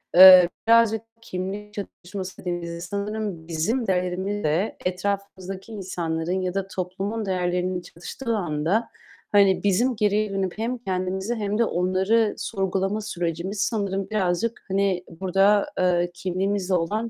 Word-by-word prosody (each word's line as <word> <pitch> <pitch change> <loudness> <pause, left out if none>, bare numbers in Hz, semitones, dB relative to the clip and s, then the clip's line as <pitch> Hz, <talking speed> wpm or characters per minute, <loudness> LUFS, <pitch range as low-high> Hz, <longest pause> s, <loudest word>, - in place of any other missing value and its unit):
eee, 185 -1 +11 0.2
birazcık 230 -1 +5 0.2
kimlik 200 +1 -5
çatışması 190 -2 -7
dediğimizde 170 -1 -4
sanırım 200 -2 -4
bizim 205 +9 -1
değerimizle 185 0 0
etrafımızdaki 195 +1 -3
insanların 175 -3 -2
ya 185 -1 -2
da 195 -1 -2
toplumun 195 +4 -3
değerlerinin 180 -1 -1
çatıştığı 225 +8 -5
anda, 175 +5 0 0.4
hani 200 -2 +4
bizim 225 +6 +2
geriye 210 -1 +1
dönüp 195 -1 -2
hem 235 +3 -2
kendimizi 190 +1 -2
hem 210 -2 -2
de 235 - +3
onları 190 +5 +2
sorgulama 195 -1 -1
sürecimiz 175 0 -3
sanırım 200 -4 -1
birazcık, 210 +2 -1
hani, 195 -2 +1
burada, 195 +4 +2
eee, 175 -1 +2
kimliğimizle 190 +2 -1
olan 210 +7 0
190 Hz, 120 wpm, -24 LUFS, 180-210 Hz, 0.4 s, eee